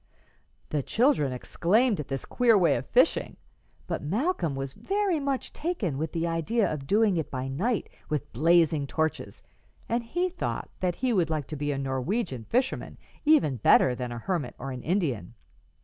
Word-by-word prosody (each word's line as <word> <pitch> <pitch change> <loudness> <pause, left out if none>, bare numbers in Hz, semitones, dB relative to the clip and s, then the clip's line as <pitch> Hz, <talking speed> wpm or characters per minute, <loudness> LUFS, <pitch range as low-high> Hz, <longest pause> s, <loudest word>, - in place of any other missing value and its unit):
'" - - -38
The 150 - +1
children 220 - +2
exclaimed 200 - +1
at 150 - -4
this 135 -1 -4
queer 235 -3 +4
way 175 -4 +4
of - - -4
fishing, - - +2 0.5
but - - -3
Malcolm 185 - -1
was 135 -1 -4
very 395 - 0
much 275 -2 -2
taken 225 - -2
with 160 0 -2
the 165 0 -1
idea 170 +7 +1
of 135 -3 -6
doing 205 -1 +3
it 160 - -2
by 130 0 -4
night 195 - -1 0.2
with 150 -1 -3
blazing 160 0 +3
torches, 160 +2 -2 0.4
and 235 +1 0
he 350 +10 -1
thought 365 0 -4
that 180 -2 0
he 255 -2 0
would 175 -6 +2
like 155 -3 -1
to 155 - -4
be 145 0 -2
a 140 - -2
Norwegian 135 - -2
fisherman 255 - -1 0.3
even 290 - +4
better 125 +3 +5
than 125 0 -4
a 120 - -5
hermit 145 -1 -3
or 135 +1 -5
an 125 -1 -6
Indian. 135 - -1
165 Hz, 180 wpm, -27 LUFS, -, 0.5 s, better